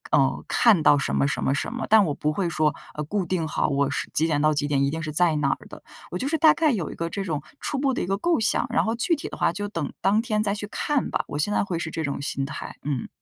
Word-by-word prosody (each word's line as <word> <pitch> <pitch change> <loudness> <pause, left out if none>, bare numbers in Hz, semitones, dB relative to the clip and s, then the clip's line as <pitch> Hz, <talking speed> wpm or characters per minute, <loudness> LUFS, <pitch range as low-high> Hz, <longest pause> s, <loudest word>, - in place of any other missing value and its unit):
嗯， 135 -2 +2
看 215 -9 +4
到 145 - +6
什 135 - -1
么 140 - +2
什 140 - -2
么 135 - +2
什 - - -2
么， - - -3
但 220 -2 +6
我 150 - -1
不 150 - -1
会 175 0 -1
说， 155 -2 +1 0.2
呃， 150 - -3
固 195 +4 -2
定 170 -2 -1
好， 150 - 0
我 140 -1 +1
是 - - -3
几 160 - +3
点 145 -3 +1
到 155 0 +3
几 145 0 -1
点 140 -1 +1
一 140 - +2
定 160 +2 -4
是 155 - -4
在 165 0 +3
哪 140 -2 +1
的。 - - -12 0.3
我 180 - -2
就 260 - -2
是 320 +3 +1
大 315 0 +6
概 315 -3 +2
有 185 -9 -2
一 - - -8
个 165 0 -3
这 195 +3 -3
种 155 -6 -3 0.2
初 285 - -2
步 270 -1 +1
的 - - -2
一 - - -1
个 195 +2 -1
构 340 +5 +1
想， 220 - +2
然 240 - +2
后 225 - 0
具 245 +9 +1
体 295 - -6
的 - - -7
话 - - +2
就 205 +4 -4
等 165 -8 -4
当 205 +3 +3
天 215 -3 -1
再 200 -1 +1
去 205 0 -5
看 290 +4 -1
吧， - - -1
我 145 - -5
现 205 +7 +1
在 - - +2
会 180 -4 -3
是 165 - -3
这 160 - -3
种 140 -1 -3
心 135 -1 -2
态。 140 +1 -7
嗯。 140 -4 -2
170 Hz, 325 characters per minute, -24 LUFS, 145-210 Hz, 0.3 s, 到